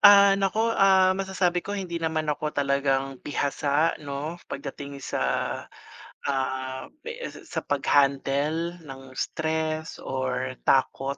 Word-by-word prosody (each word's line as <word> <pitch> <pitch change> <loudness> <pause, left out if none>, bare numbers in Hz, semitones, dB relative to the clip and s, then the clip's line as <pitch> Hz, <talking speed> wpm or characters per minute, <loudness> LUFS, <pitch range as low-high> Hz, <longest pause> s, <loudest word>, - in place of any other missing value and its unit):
Ah, 200 -1 +9
naku, 220 +4 +2
ah, 190 -2 +5
masasabi 190 -2 0
ko 205 +2 -4
hindi 175 -3 -3
naman 160 -1 0
ako 150 +1 -2
talagang 135 -1 +1
bihasa, 145 +2 +1
no, 145 +4 -5
pagdating 140 0 -6
sa, - - -2 1.1
ah, 130 -1 -2 0.4
sa - - -10
sa - - -1
pag - - 0
handle 145 +4 +2
ng 135 -1 -10
stress 160 0 -2
or 130 -1 -2
takot. 135 +1 +2
145 Hz, 120 wpm, -26 LUFS, 135-175 Hz, 1.1 s, Ah